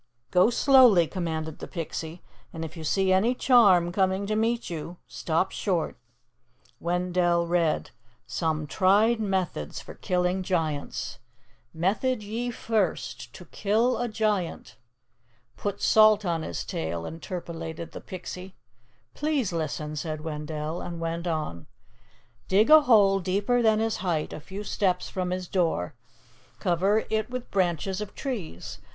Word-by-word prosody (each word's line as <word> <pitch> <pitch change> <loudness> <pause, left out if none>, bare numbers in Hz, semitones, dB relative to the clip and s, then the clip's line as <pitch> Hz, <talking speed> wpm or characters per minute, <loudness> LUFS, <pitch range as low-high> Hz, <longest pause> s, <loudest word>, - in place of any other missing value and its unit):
"Go 180 +5 +5
slowly," 245 -8 +6
commanded 160 -3 -4
the - - -7
Pixie. 165 0 -6 0.3
"And 165 0 -5
if 160 +2 -9
you 165 - -7
see 190 +4 +2
any 220 +7 +3
charm 200 -10 +5
coming 190 +1 +1
to 215 +1 -1
meet 230 +2 0
you, 170 +1 -6
stop 165 +3 -1
short." 180 -6 -1 0.8
Wendell 175 0 +1
read: 170 -2 0 0.3
"'SOME 155 +5 -1
TRIED 205 +8 +3
METHODS 185 - -2
FOR - - -10
KILLING 180 +1 0
GIANTS. 160 -6 -2 0.5
"'Method 210 +8 0
ye 230 +4 -3
first: 225 -2 -2
To - - -11
kill 225 +5 +1
a 245 - 0
giant 215 -5 -2 0.4
'" 120 0 -40
"Put 205 -1 -4
salt 215 -1 +6
on 170 -2 0
his 85 - -4
tail," 85 +1 -3
interpolated 165 - -6
the - - -8
Pixie. 185 +1 -8 0.6
"Please 290 - -1
listen," 155 -1 -3
said 155 0 -4
Wendell, 155 +1 -4
and 170 -1 -6
went 165 +1 -3
on, 155 - -3 0.8
"'Dig 210 +8 +4
a 310 0 +10
hole 205 -8 +5
deeper 200 +7 +1
than 220 -2 +4
his 225 0 0
height 170 -4 -2
a - - -6
few 190 +6 -7
steps 185 -3 0
from 185 -1 -2
his 185 0 -3
door. 165 - 0 0.6
Cover 195 +4 +1
it 220 0 0
with 250 -1 -6
branches 185 +1 0
of 210 - -7
trees. 200 - -5
180 Hz, 140 wpm, -27 LUFS, 165-210 Hz, 0.8 s, a